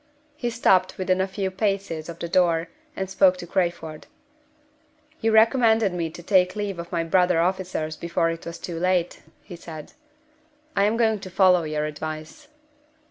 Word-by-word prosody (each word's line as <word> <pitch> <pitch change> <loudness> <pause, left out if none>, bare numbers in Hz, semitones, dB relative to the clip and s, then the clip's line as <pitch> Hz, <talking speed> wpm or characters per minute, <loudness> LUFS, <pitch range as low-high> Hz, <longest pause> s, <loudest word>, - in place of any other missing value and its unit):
He 245 -5 -2
stopped 190 -6 +2
within 185 0 +1
a 190 - 0
few 190 0 -3
paces 195 -5 -2
of 170 - -7
the 170 - -5
door, 170 -2 +2 0.3
and 190 - -3
spoke 185 -1 +3
to 175 - -7
Crayford. 170 -3 -2 1.1
"You 225 - +1
recommended 220 -2 +4
me 170 -2 -2
to 175 +2 -11
take 185 0 +3
leave 205 -4 -3
of 170 +2 -7
my 170 -2 0
brother 180 0 +2
officers 175 -3 -1
before 170 0 0
it 165 0 -7
was 170 0 -6
too 170 -1 -6
late," 180 -1 0 0.2
he 175 - -10
said. 160 -3 -10 0.8
"I 200 - +3
am 215 +2 +1
going 220 -2 +2
to 190 - -9
follow 185 -1 +4
your 155 0 -2
advice." 155 - -7
180 Hz, 170 wpm, -24 LUFS, 165-195 Hz, 1.1 s, recommended